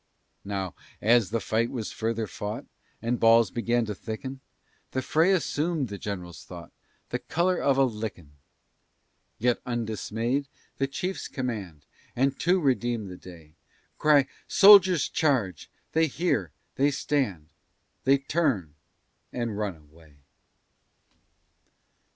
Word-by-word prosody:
Now, 95 -2 -3 0.3
as 115 -2 +4
the 115 +2 0
fight 115 +2 0
was 115 -5 -4
further 115 0 -2
fought, 105 +1 -5 0.4
And 120 +1 0
balls 115 -3 +5
began 120 0 0
to 105 - -3
thicken, 120 +6 -6 0.5
The 130 - -1
fray 160 +7 +3
assum'd, 160 - 0
the 100 -1 -6
gen'rals 90 -4 -6
thought, - - -10 0.4
The 125 - -2
color 170 +8 0
of 140 -1 +2
a 135 - +5
lickin'. 105 - -4 1.1
Yet 120 +1 +1
undismay'd 120 +2 -2 0.3
the 135 - 0
chiefs 180 +7 -4
command, 105 - -5 0.3
And 135 +2 +1
to 180 +2 +3
redeem 120 - 0
the 90 - -8
day, 80 -5 -14 0.5
Cry, 145 -3 +5 0.2
SOLDIERS, 195 -4 +7
CHARGE! 115 - 0 0.2
they 160 0 +3
hear, 135 - -1 0.3
they 140 +2 +4
stand, 130 - -1 0.5
They 135 +2 +5
turn 135 - 0 0.6
and 120 -3 -3
run 105 -3 -2
away. 75 0 -20
120 Hz, 120 wpm, -27 LUFS, 100-140 Hz, 1.1 s, SOLDIERS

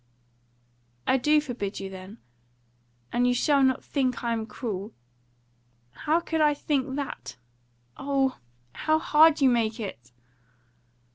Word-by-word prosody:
"I 265 - +3
do 300 +4 +4
forbid 240 -9 -4
you, 195 - -5
then. 190 +3 -10 1.0
And 245 +1 +2
you 245 - +2
shall 280 +2 +3
not 260 -1 +2
think 260 -4 -1
I 235 -1 0
am 220 -1 -3
cruel 210 -3 -5 0.5
" 120 0 -40 0.2
"How 315 +3 +3
could 320 -2 -2
I 300 -1 +4
think 275 -2 -1
that?" 265 - -5 0.6
"Oh, 270 -2 0 0.3
how 310 0 +1
hard 315 0 +5
you 270 - +6
make 230 -2 +1
it!" 125 - -7
250 Hz, 135 wpm, -26 LUFS, 200-290 Hz, 1.0 s, you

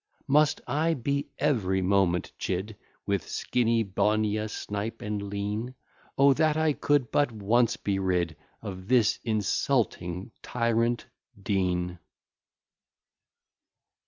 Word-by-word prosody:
Must 150 +1 +3
I 160 +3 +1
be 140 +3 -1
every 105 -11 +1
moment 90 -2 +2
chid 95 +4 -3 0.3
With 100 -4 0
Skinnybonia, 110 -2 +1
Snipe, 105 +2 -4
and 105 -3 -3
Lean? 105 +5 -3 0.4
O! 140 0 +6
that 155 +2 +2
I 155 -1 +2
could 145 -4 +1
but 145 -4 +2
once 115 +2 +2
be 100 -1 -1
rid 90 -4 0 0.3
Of 95 -3 -7
this 120 -3 +3
insulting 105 -4 0
tyrant 115 0 0 0.3
Dean! 90 -3 -1
110 Hz, 100 wpm, -28 LUFS, 95-125 Hz, 0.4 s, O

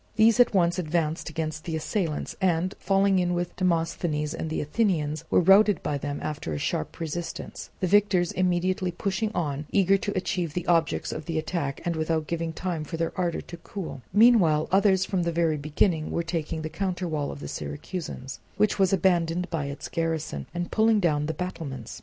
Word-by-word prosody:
These 225 +2 +5
at 245 - +6
once 175 -1 +3
advanced 160 -1 -1
against 160 0 -4
the 165 -3 -2
assailants 160 -1 -2
and, 180 0 +1
falling 195 -1 +3
in 175 0 +1
with 175 0 -3
Demosthenes 165 -3 0
and 160 - -4
the 160 - -2
Athenians, 155 -3 0
were - - +4
routed 195 +2 +5
by 145 -1 -1
them 145 +1 -3
after 150 - -3
a - - -2
sharp 75 +1 -3
resistance, 165 +1 -5
the - - +2
victors 190 -2 +3
immediately 185 0 +1
pushing 200 +4 -2
on, 150 -3 -2
eager 195 0 +4
to 205 0 -3
achieve 175 -4 -2
the 180 -1 -2
objects 165 -3 +1
of 155 - -5
the 165 - -2
attack 155 -3 -2
without 160 0 -1
giving 165 0 -2
time 170 -1 -3
for 165 +2 -5
their 165 0 -1
ardour 175 -3 -1
to 170 - -10
cool; 170 -5 -7
meanwhile 195 -8 +5
others 190 -1 +4
from 190 -2 -1
the 170 0 0
very 165 -2 +1
beginning 155 +2 +1
were 170 - -1
taking 165 -1 -3
the 155 - -3
counterwall 175 -6 -2
of 70 - -8
the 70 - -6
Syracusans, 130 - -6 0.2
which 210 -1 +2
was 190 -2 +4
abandoned 180 -1 +1
by 160 -4 -1
its 140 +1 -6
garrison, 160 - -2
and 175 0 -4
pulling 220 -1 +4
down 150 -5 +1
the 160 - -1
battlements. 150 - -5
170 Hz, 185 wpm, -26 LUFS, 155-185 Hz, 0.2 s, at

